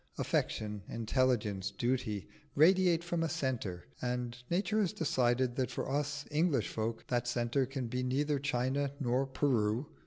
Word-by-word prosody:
Affection, 105 Hz, -1 st, -1 dB
intelligence, 115 Hz, -4 st, +1 dB
duty, 120 Hz, -5 st, -1 dB, 0.3 s
radiate 175 Hz, +2 st, +5 dB
from 170 Hz, -1 st, -1 dB
a 165 Hz, -, +1 dB
centre, 125 Hz, -, -2 dB, 0.2 s
and 125 Hz, -1 st, -2 dB
nature 195 Hz, +4 st, +1 dB
has 195 Hz, -6 st, +1 dB
decided 125 Hz, -4 st, +1 dB
that 130 Hz, -2 st, +1 dB
for -, -, -3 dB
us 145 Hz, +1 st, -1 dB
English 150 Hz, -5 st, +2 dB
folk 115 Hz, +1 st, -3 dB
that 120 Hz, -1 st, 0 dB
centre 120 Hz, +2 st, +1 dB
can 135 Hz, -1 st, -3 dB
be 125 Hz, +2 st, -2 dB
neither 140 Hz, +3 st, +1 dB
China 135 Hz, +1 st, 0 dB
nor 130 Hz, 0 st, +1 dB
Peru. 125 Hz, -3 st, +1 dB
130 Hz, 145 wpm, -33 LUFS, 120-145 Hz, 0.3 s, radiate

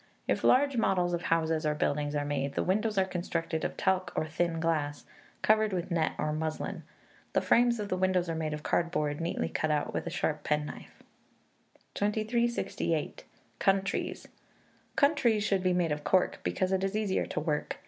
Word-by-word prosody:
If -, -, 0 dB
large 275 Hz, 0 st, +4 dB
models 180 Hz, -5 st, +2 dB
of 175 Hz, -, -1 dB
houses 160 Hz, -1 st, +1 dB
or 150 Hz, -1 st, +1 dB
buildings 145 Hz, 0 st, 0 dB
are 145 Hz, 0 st, 0 dB
made, 140 Hz, -1 st, -2 dB
the -, -, +1 dB
windows 210 Hz, +3 st, 0 dB
are 190 Hz, -, +4 dB
constructed 170 Hz, -3 st, -3 dB
of -, -, -3 dB
talc 190 Hz, -1 st, +1 dB
or -, -, 0 dB
thin 165 Hz, +1 st, -1 dB
glass, 155 Hz, -3 st, -1 dB, 0.4 s
covered 215 Hz, -1 st, +3 dB
with 180 Hz, 0 st, -3 dB
net 165 Hz, -2 st, +1 dB
or 150 Hz, 0 st, -1 dB
muslin. 155 Hz, 0 st, -3 dB, 0.5 s
The -, -, +3 dB
frames 240 Hz, -1 st, +3 dB
of 205 Hz, -1 st, -3 dB
the 185 Hz, -, 0 dB
windows 185 Hz, -1 st, +2 dB
are 165 Hz, -, -1 dB
made 155 Hz, -1 st, -2 dB
of 150 Hz, -, -9 dB
cardboard, 150 Hz, -3 st, 0 dB
neatly 165 Hz, -, -1 dB
cut 155 Hz, -, -1 dB
out 150 Hz, -1 st, 0 dB
with -, -, -3 dB
a -, -, 0 dB
sharp 155 Hz, -2 st, -1 dB
penknife. 150 Hz, 0 st, -3 dB, 0.9 s
2368. 215 Hz, -6 st, -1 dB, 0.3 s
Countries. 195 Hz, 0 st, 0 dB, 0.7 s
Countries 255 Hz, -8 st, +3 dB
should 195 Hz, -2 st, +1 dB
be 185 Hz, 0 st, +2 dB
made 175 Hz, -3 st, +1 dB
of 150 Hz, 0 st, -2 dB
cork, 180 Hz, +5 st, +2 dB
because 185 Hz, 0 st, -1 dB
it 190 Hz, 0 st, +1 dB
is 195 Hz, +1 st, -1 dB
easier 210 Hz, -3 st, 0 dB
to -, -, -2 dB
work. 150 Hz, -1 st, -2 dB
175 Hz, 180 wpm, -30 LUFS, 155-195 Hz, 0.9 s, large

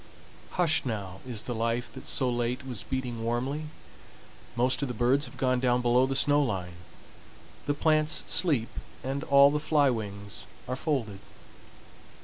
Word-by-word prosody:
Hushed 165 Hz, -3 st, +2 dB
now 100 Hz, -6 st, -5 dB
is 115 Hz, -4 st, -3 dB
the 125 Hz, -, -4 dB
life 115 Hz, +1 st, -2 dB
that -, -, -10 dB
so 130 Hz, -, +1 dB
late 120 Hz, +2 st, -2 dB
was 125 Hz, -6 st, -5 dB
beating 125 Hz, -2 st, -4 dB
warmly. 130 Hz, +6 st, -2 dB, 0.9 s
Most 125 Hz, +3 st, +2 dB
of 140 Hz, -, -1 dB
the 125 Hz, -, -5 dB
birds 130 Hz, +5 st, +2 dB
have -, -, -13 dB
gone 130 Hz, -1 st, +1 dB
down 125 Hz, -1 st, +2 dB
below 125 Hz, +2 st, +3 dB
the 135 Hz, -, -2 dB
snow 145 Hz, +2 st, +4 dB
line, 95 Hz, -9 st, -2 dB, 0.9 s
the 145 Hz, -, +1 dB
plants 155 Hz, 0 st, +2 dB
sleep, 140 Hz, -11 st, +3 dB, 0.3 s
and 135 Hz, +2 st, -3 dB
all 140 Hz, 0 st, +6 dB
the 150 Hz, -, 0 dB
fly 150 Hz, -2 st, +3 dB
wings 100 Hz, -3 st, -4 dB, 0.2 s
are 125 Hz, -, -2 dB
folded. 130 Hz, -, -2 dB
125 Hz, 155 wpm, -28 LUFS, 115-140 Hz, 0.9 s, all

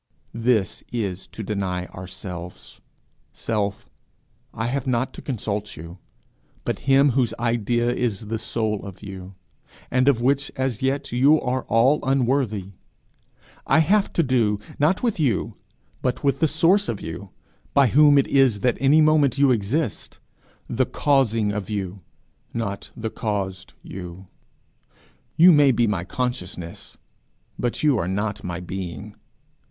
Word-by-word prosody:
This 115 Hz, -4 st, 0 dB
is 100 Hz, -6 st, -3 dB
to 110 Hz, -, -8 dB
deny 95 Hz, -3 st, -2 dB
ourselves. 90 Hz, -1 st, -9 dB, 0.5 s
'Self, 105 Hz, -3 st, -2 dB, 0.6 s
I 110 Hz, -, -4 dB
have 130 Hz, +2 st, -2 dB
not 125 Hz, 0 st, 0 dB
to -, -, -9 dB
consult 105 Hz, -5 st, -4 dB
you, 85 Hz, +3 st, -10 dB, 0.7 s
but -, -, -2 dB
him 135 Hz, +1 st, +5 dB
whose 125 Hz, -2 st, +1 dB
idea 120 Hz, +1 st, 0 dB
is 120 Hz, -6 st, -1 dB
the 110 Hz, +1 st, -3 dB
soul 110 Hz, -2 st, -2 dB
of 100 Hz, 0 st, -10 dB
you, 95 Hz, -1 st, -9 dB, 0.6 s
and 130 Hz, +1 st, +2 dB
of 135 Hz, -5 st, +4 dB
which 140 Hz, +3 st, +1 dB
as 130 Hz, -4 st, -2 dB
yet 135 Hz, +2 st, -1 dB
you 140 Hz, +6 st, +4 dB
are 130 Hz, +1 st, -2 dB
all 130 Hz, +6 st, +3 dB
unworthy. 125 Hz, -7 st, 0 dB, 1.0 s
I -, -, +4 dB
have 195 Hz, +6 st, +3 dB
to 170 Hz, -, +2 dB
do, 115 Hz, -7 st, +1 dB, 0.2 s
not 160 Hz, +9 st, +2 dB
with 230 Hz, -7 st, 0 dB
you, 125 Hz, -10 st, 0 dB, 0.5 s
but 125 Hz, +2 st, -2 dB
with 140 Hz, -1 st, +1 dB
the 160 Hz, -, +3 dB
source 175 Hz, +7 st, +3 dB
of 105 Hz, -, -3 dB
you, 90 Hz, +5 st, -7 dB, 0.5 s
by 140 Hz, -, +6 dB
whom 145 Hz, +4 st, +6 dB
it 140 Hz, -, +4 dB
is 130 Hz, -7 st, +3 dB
that 125 Hz, -2 st, +1 dB
any 140 Hz, +4 st, +5 dB
moment 150 Hz, -4 st, +3 dB
you 140 Hz, -1 st, +4 dB
exist 115 Hz, +4 st, -2 dB, 0.5 s
the 125 Hz, +2 st, 0 dB
Causing 115 Hz, -7 st, +2 dB
of 105 Hz, -1 st, -4 dB
you, 100 Hz, -2 st, -4 dB, 0.5 s
not 100 Hz, -3 st, -3 dB
the 110 Hz, -1 st, -4 dB
caused 95 Hz, -3 st, -4 dB
you. 90 Hz, 0 st, -9 dB, 1.1 s
You 175 Hz, +3 st, +8 dB
may 145 Hz, -4 st, +6 dB
be 120 Hz, -1 st, +2 dB
my 100 Hz, -6 st, -1 dB
consciousness, 90 Hz, -8 st, -5 dB, 0.6 s
but 120 Hz, +3 st, -2 dB
you 145 Hz, -6 st, +3 dB
are 85 Hz, -, -1 dB
not 105 Hz, +2 st, -2 dB
my 85 Hz, -1 st, -4 dB
being. 95 Hz, +3 st, -6 dB
115 Hz, 145 wpm, -23 LUFS, 100-135 Hz, 1.1 s, You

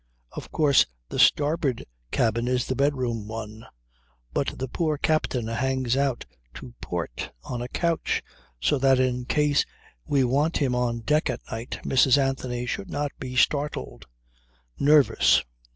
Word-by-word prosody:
Of -, -, -9 dB
course 145 Hz, -4 st, +4 dB, 0.2 s
the -, -, -4 dB
starboard 145 Hz, -4 st, +3 dB, 0.2 s
cabin 115 Hz, -, 0 dB
is 125 Hz, -1 st, +1 dB
the 130 Hz, -, -2 dB
bedroom 125 Hz, -6 st, 0 dB
one, 110 Hz, 0 st, -7 dB, 0.7 s
but -, -, -1 dB
the 130 Hz, -, -3 dB
poor 155 Hz, +3 st, -1 dB
captain 140 Hz, -6 st, 0 dB
hangs 130 Hz, +2 st, 0 dB
out 135 Hz, -3 st, 0 dB, 0.3 s
to -, -, -10 dB
port -, -, -4 dB
on 120 Hz, -2 st, -5 dB
a 120 Hz, -, -4 dB
couch, 170 Hz, +4 st, -1 dB, 0.4 s
so 60 Hz, -, +1 dB
that 135 Hz, -1 st, +4 dB
in 125 Hz, -1 st, 0 dB
case 145 Hz, +1 st, +2 dB, 0.4 s
we 140 Hz, -2 st, +2 dB
want 140 Hz, +6 st, +1 dB
him 135 Hz, -4 st, +1 dB
on 120 Hz, -1 st, -1 dB
deck 150 Hz, +5 st, +1 dB
at 125 Hz, -, -3 dB
night, 115 Hz, +3 st, -5 dB
Mrs. 130 Hz, +1 st, +4 dB
Anthony 130 Hz, -3 st, -1 dB
should 195 Hz, +9 st, -4 dB
not 145 Hz, -3 st, -2 dB
be 130 Hz, -1 st, -6 dB
startled. 125 Hz, -, 0 dB, 0.7 s
Nervous! 145 Hz, 0 st, +5 dB
130 Hz, 145 wpm, -25 LUFS, 120-145 Hz, 0.7 s, Nervous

